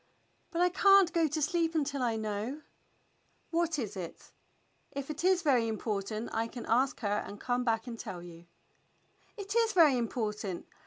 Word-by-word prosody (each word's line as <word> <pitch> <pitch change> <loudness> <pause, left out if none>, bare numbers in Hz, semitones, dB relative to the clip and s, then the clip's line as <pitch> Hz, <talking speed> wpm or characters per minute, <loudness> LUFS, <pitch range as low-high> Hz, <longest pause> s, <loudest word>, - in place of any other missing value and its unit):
"But 335 - -2
I 360 - +5
can't 390 -1 +5
go 335 -2 +3
to 305 +1 -2
sleep 330 +1 +1
until 285 -3 0
I 235 -2 +1
know." 220 +6 -3 0.9
"What 335 -1 +1
is 220 -6 -3
it.^ 180 -3 -8 0.6
If 280 +1 -5
it 305 +2 -6
is 370 -1 +3
very 255 -7 +3
important 215 0 -3
I 225 +1 0
can 235 +1 -8
ask 255 +4 +1
her 205 -1 0
and 205 - -9
come 245 0 0
back 225 -1 0
and 235 -2 -7
tell 175 -1 -6
you." 170 -1 -12
250 Hz, 150 wpm, -31 LUFS, 220-320 Hz, 0.9 s, I